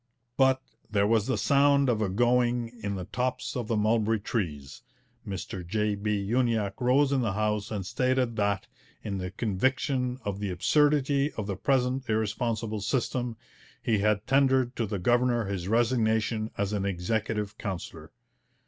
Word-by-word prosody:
But 130 -1 +3 0.3
'there 100 -2 +2
was 110 0 +2
the 130 - 0
sound 140 0 +4
of 115 -3 +1
a 105 - +1
going 120 +2 +2
in 100 -1 -2
the 90 -2 -5
tops 125 +5 -2
of 120 -4 -3
the 115 - 0
mulberry 110 +1 +2
trees.' 75 - -4 0.5
Mr 95 -1 -5
J. 105 +4 0
B. 105 0 -1
Uniacke 115 -3 0
rose 135 +3 +3
in 135 -2 +2
the 110 -5 0
House 105 0 -1
and 100 -4 -4
stated 125 +2 0
that, 100 -3 0 0.4
in 100 -2 -3
the 90 0 -3
conviction 125 +5 -1
of 100 -1 -3
the 100 -1 -2
absurdity 145 - +2
of 110 - -4
the 100 -1 -3
present 130 +3 0
irresponsible 110 0 -1
system, 120 +1 -1 0.4
he 110 -3 +1
had 105 0 +1
tendered 130 -1 +3
to 115 - -1
the 100 0 -2
governor 120 +3 +2
his 95 -3 -4
resignation 110 -1 +1
as 100 +1 -1
an 100 -2 -1
Executive 105 +3 -2
Councillor. 85 -4 -6
110 Hz, 155 wpm, -28 LUFS, 100-125 Hz, 0.5 s, sound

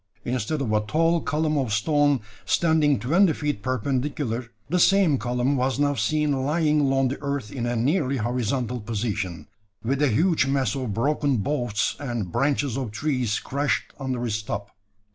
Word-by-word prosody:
Instead 125 +4 -1
of 110 -4 -1
a 105 - +4
tall 165 +9 +1
column 155 -1 0
of 130 -5 -1
stone, 145 +5 +2 0.2
standing 155 -4 +3
twenty 170 +7 +3
feet 145 -9 -2
perpendicular, 130 -1 -2 0.2
the 180 - +1
same 180 -7 +4
column 125 +4 0
was 130 0 0
now 145 0 +2
seen 140 +4 0
lying 150 +1 +2
along 135 -2 +2
the 135 - -5
earth 140 -7 -3
in 120 0 -3
a 120 - -1
nearly 135 +3 +1
horizontal 125 +1 -1
position, 105 -7 -3 0.4
with 135 +5 0
a 145 - +4
huge 155 - +2
mass 135 -5 +1
of 130 -5 -3
broken 140 +4 +1
boughs 120 -2 -1
and 120 -9 -3
branches 140 - 0
of 130 -4 -3
trees 125 -2 -1
crushed 140 +2 -2
under 130 -3 -2
its 110 -1 -1
top. 100 -1 -5
135 Hz, 160 wpm, -25 LUFS, 115-145 Hz, 0.4 s, a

